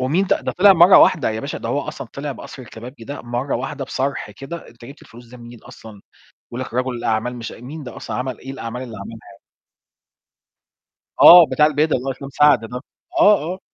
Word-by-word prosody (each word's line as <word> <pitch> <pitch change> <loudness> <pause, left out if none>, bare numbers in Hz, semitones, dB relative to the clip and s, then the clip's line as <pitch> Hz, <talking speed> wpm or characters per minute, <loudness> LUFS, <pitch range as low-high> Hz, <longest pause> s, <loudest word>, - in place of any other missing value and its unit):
ومين 160 +10 0
ده؟ - - +1
ده - - -4
طلع 200 +2 +6
مرّة 180 +1 +7
واحدة، 160 -10 +3
يا 110 0 -4
باشا 140 - -6
ده - - -6
هو 145 - -1
أصلًا 135 -2 -8
طلع 140 +1 -5
بقصر 130 +1 -11
الكبابجي 120 +2 -12
ده 140 +4 -8
مرّة 120 +3 -3
واحدة، 135 +2 -5
بصرح 135 -3 -4
كده، 135 +11 -9
أنت 115 0 -16
جِبت 140 +5 -13
الفلوس 120 +1 -16
دي 125 - -14
منين 120 -1 -13
أصلًا؟ 110 -3 -14 0.5
بيقول 120 - -5
لك 130 - -8
رجل 130 +1 -1
الأعمال 115 +1 -2
مش 115 -2 -7
مين 145 +6 -10
ده 125 -3 -10
أصلًا؟ 110 - -6
عمل 125 -2 -5
إيه 135 - -9
الأعمال 125 -1 -7
اللي 115 -4 -9
عملها 110 +3 -9
يعني؟ 100 - -21 1.8
آه 175 -1 +10
بتاع 150 - +3
البِدل 155 +1 +1
اللي 125 - -5
هو - - 0
اسلام 135 +1 -9
سعد 145 -2 +4
ده. 125 +1 -6 0.4
آه، 210 -6 +5
آه. 185 - -10
130 Hz, 215 wpm, -20 LUFS, 120-145 Hz, 1.8 s, آه